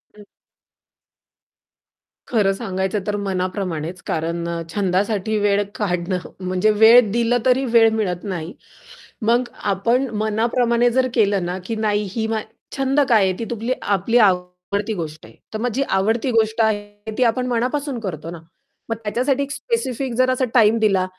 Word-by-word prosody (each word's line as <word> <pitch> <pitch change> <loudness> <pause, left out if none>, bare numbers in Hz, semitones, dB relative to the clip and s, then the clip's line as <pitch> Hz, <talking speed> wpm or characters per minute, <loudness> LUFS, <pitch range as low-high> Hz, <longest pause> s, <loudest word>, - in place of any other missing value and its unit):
हं. 210 - -14 2.0
खरं 210 -5 +2
सांगायचं 190 -1 -2
तर 210 - 0
मनाप्रमाणेच. 185 -3 -3
कारण 170 +1 -2
अ, 170 0 -3
छंदासाठी 205 +2 0
वेळ 205 0 +2
काढणं 180 -2 -1 0.3
म्हणजे 185 +4 +2
वेळ 220 +3 +7
दिलं, 235 +2 +2
तरी 260 +1 +3
वेळ 225 -1 +7
मिळत 180 -5 -2
नाही. 180 -4 -5 0.7
मग 235 +3 +3 0.3
आपण 235 +8 +1
मनाप्रमाणे 235 +2 +2
जर 260 +2 +2
केलं 200 -6 +2
ना, 180 +1 -3
की 225 - -3
नाही 205 -1 0
ही 225 -1 -1
मा 220 -1 -1 0.4
छंद 270 +1 +1
काय 220 -4 +5
आहे? 190 -1 +2
ती 230 - -3
तूम 230 0 -4
आपली 205 +4 +1
आवडती 185 +1 +1
गोष्ट 155 - -6
आहे. 110 - -16 0.2
तर 215 - -3
मग 245 +2 0
जी 270 +4 +1
आवडती 225 +6 +1
गोष्ट 220 0 +2
आहे, 205 0 -2
ती 255 - +3
आपण 250 +2 +1
मनापासून 250 +3 -1
करतो 165 -7 -5
ना, 170 - -8 0.5
मग 225 - 0
त्याच्यासाठी 255 +6 0
एक 280 - -7
स्पेसिफिक 270 - -2
जर 255 0 +3
असा 255 0 +1
टाईम 225 -2 +5
दिला, 195 -4 +2
215 Hz, 155 wpm, -21 LUFS, 190-235 Hz, 2.0 s, वेळ